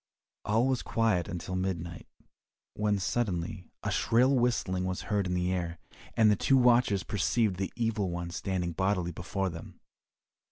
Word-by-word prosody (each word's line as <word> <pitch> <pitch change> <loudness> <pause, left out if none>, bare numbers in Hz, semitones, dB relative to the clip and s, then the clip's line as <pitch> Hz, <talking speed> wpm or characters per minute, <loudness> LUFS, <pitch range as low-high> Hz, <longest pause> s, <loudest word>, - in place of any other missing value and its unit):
All 110 +4 +2
was 130 -2 +1
quiet 110 -7 +1
until 90 +1 -4
midnight, 85 -3 -3 0.7
when 105 -1 +1
suddenly 95 -4 -2 0.2
a - - -1
shrill 125 +4 +3
whistling 120 -7 +1
was 95 -1 -2
heard 100 -2 +1
in 90 - -1
the 90 +1 0
air, 85 -2 -3 0.4
and 110 -2 +6
the - - +4
two 135 +7 +3
watchers 120 -6 +4
perceived 105 0 +1
the 95 0 -2
Evil 110 -5 0
One 85 0 -4
standing 90 -1 -2
bodily 90 0 0
before 95 +3 -2
them. 80 -1 -10
95 Hz, 155 wpm, -30 LUFS, 90-110 Hz, 0.7 s, and